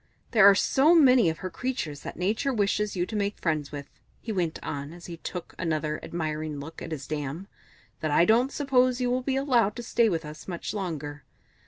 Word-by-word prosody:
"There 210 Hz, -4 st, +8 dB
are 200 Hz, -, +6 dB
so 290 Hz, -, +4 dB
many 255 Hz, -, +6 dB
of 160 Hz, -, -3 dB
her 185 Hz, -, -3 dB
creatures 165 Hz, -, -3 dB
that -, -, -8 dB
Nature 215 Hz, +9 st, 0 dB
wishes 210 Hz, -2 st, 0 dB
you 175 Hz, -1 st, 0 dB
to 220 Hz, -, -7 dB
make 205 Hz, 0 st, -1 dB
friends 155 Hz, -4 st, -1 dB
with," 145 Hz, -1 st, -6 dB, 0.3 s
he 230 Hz, -, -5 dB
went 175 Hz, -6 st, -1 dB
on 140 Hz, +2 st, -5 dB
as 175 Hz, 0 st, -12 dB
he 170 Hz, -1 st, -7 dB
took 175 Hz, +1 st, -7 dB
another 155 Hz, -2 st, -1 dB
admiring 155 Hz, -3 st, -3 dB
look 160 Hz, +3 st, -9 dB
at -, -, -7 dB
his 145 Hz, -3 st, -5 dB
dam, 150 Hz, +4 st, -4 dB, 0.5 s
"that 155 Hz, -, -2 dB
I 150 Hz, +3 st, +4 dB
don't 240 Hz, +7 st, +3 dB
suppose 255 Hz, -3 st, +2 dB
you 250 Hz, -1 st, 0 dB
will 255 Hz, +1 st, +1 dB
be 265 Hz, +1 st, -1 dB
allowed 245 Hz, -7 st, +2 dB
to 240 Hz, -, -6 dB
stay 230 Hz, 0 st, +2 dB
with 165 Hz, -4 st, -2 dB
us 150 Hz, 0 st, -10 dB
much 175 Hz, +1 st, -4 dB
longer. 150 Hz, -7 st, -4 dB
180 Hz, 210 wpm, -27 LUFS, 155-240 Hz, 0.5 s, There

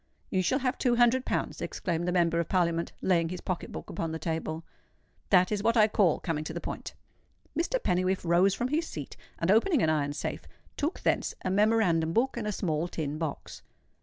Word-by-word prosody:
"You 185 Hz, -, +2 dB
shall 255 Hz, +8 st, +2 dB
have 260 Hz, -1 st, -1 dB
two 245 Hz, -2 st, +2 dB
hundred 240 Hz, +2 st, +4 dB
pounds," -, -, -2 dB
exclaimed 175 Hz, -2 st, -2 dB
the -, -, +1 dB
Member 170 Hz, -2 st, +2 dB
of 170 Hz, -, -2 dB
Parliament, 170 Hz, -2 st, +1 dB
laying 170 Hz, -3 st, +2 dB
his 180 Hz, 0 st, -5 dB
pocket 185 Hz, -2 st, -4 dB
book -, -, -7 dB
upon 165 Hz, -1 st, -3 dB
the 160 Hz, -, -3 dB
table. 160 Hz, 0 st, -3 dB, 0.7 s
"That 180 Hz, -1 st, +5 dB
is 210 Hz, -1 st, 0 dB
what 230 Hz, +2 st, +2 dB
I 215 Hz, -1 st, +7 dB
call 200 Hz, -6 st, +2 dB
coming 160 Hz, -3 st, -2 dB
to 160 Hz, -, -5 dB
the 170 Hz, -, -3 dB
point." -, -, -6 dB, 0.6 s
Mr. 345 Hz, +9 st, +1 dB
Pennywhiffe 185 Hz, -, 0 dB
rose 180 Hz, +3 st, +4 dB
from 245 Hz, +1 st, -2 dB
his 320 Hz, +3 st, 0 dB
seat, 145 Hz, -3 st, -7 dB, 0.2 s
and 165 Hz, +3 st, +1 dB
opening 245 Hz, -, +3 dB
an 155 Hz, -, +3 dB
iron 145 Hz, -2 st, 0 dB
safe, -, -, -5 dB, 0.3 s
took 300 Hz, +5 st, -2 dB
thence -, -, 0 dB
a 185 Hz, -, +1 dB
memorandum 190 Hz, -6 st, +3 dB
book 255 Hz, +6 st, +1 dB
and 230 Hz, -3 st, -3 dB
a -, -, 0 dB
small 165 Hz, -4 st, -1 dB
tin 155 Hz, -3 st, -4 dB
box. 160 Hz, -4 st, -5 dB
180 Hz, 205 wpm, -29 LUFS, 165-225 Hz, 0.7 s, I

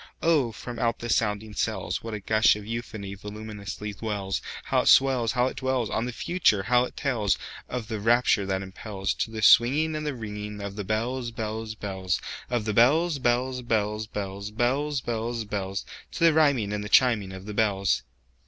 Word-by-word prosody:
Oh, 155 Hz, -8 st, +3 dB
from 120 Hz, +2 st, -7 dB
out 115 Hz, -1 st, +1 dB
the 120 Hz, -, -6 dB
sounding 105 Hz, 0 st, 0 dB
cells, 105 Hz, -2 st, -2 dB
What 115 Hz, -1 st, -4 dB
a -, -, -4 dB
gush 110 Hz, +2 st, +4 dB
of 105 Hz, -1 st, -8 dB
euphony 110 Hz, -3 st, -5 dB
voluminously 105 Hz, 0 st, -7 dB
wells! 100 Hz, -3 st, -2 dB, 0.2 s
How -, -, +2 dB
it -, -, -4 dB
swells! 130 Hz, -4 st, +5 dB
How 125 Hz, -1 st, +2 dB
it 130 Hz, -, -3 dB
dwellsOn 125 Hz, -3 st, -1 dB
the -, -, -3 dB
Future! 120 Hz, -, +1 dB
how 125 Hz, +3 st, +3 dB
it -, -, -10 dB
tellsOf 120 Hz, -1 st, -2 dB
the 110 Hz, -1 st, -4 dB
rapture 115 Hz, -2 st, +3 dB
that 95 Hz, 0 st, -1 dB
impelsTo 95 Hz, +2 st, -3 dB
the 110 Hz, -1 st, -4 dB
swinging 150 Hz, +9 st, +5 dB
and 155 Hz, -, -3 dB
the 150 Hz, -1 st, -2 dB
ringingOf 105 Hz, -2 st, -6 dB
the 105 Hz, -, -4 dB
bells, 120 Hz, +5 st, -1 dB
bells, 110 Hz, -1 st, -4 dB
bells, 95 Hz, -4 st, -2 dB, 0.3 s
Of 120 Hz, -3 st, -1 dB
the 110 Hz, -, -1 dB
bells, 145 Hz, +8 st, +4 dB
bells, 125 Hz, +1 st, +1 dB
bells, 110 Hz, -2 st, -1 dB
bells, 100 Hz, -1 st, -5 dB
Bells, 135 Hz, +6 st, 0 dB
bells, 115 Hz, 0 st, -2 dB
bells—To 100 Hz, +8 st, -5 dB
the 165 Hz, -1 st, +6 dB
rhyming 140 Hz, -10 st, +3 dB
and 105 Hz, 0 st, -2 dB
the 105 Hz, -, -6 dB
chiming 110 Hz, -6 st, +4 dB
of 95 Hz, 0 st, -9 dB
the 105 Hz, -, -6 dB
bells! 100 Hz, -3 st, +1 dB
110 Hz, 175 wpm, -26 LUFS, 105-125 Hz, 0.3 s, the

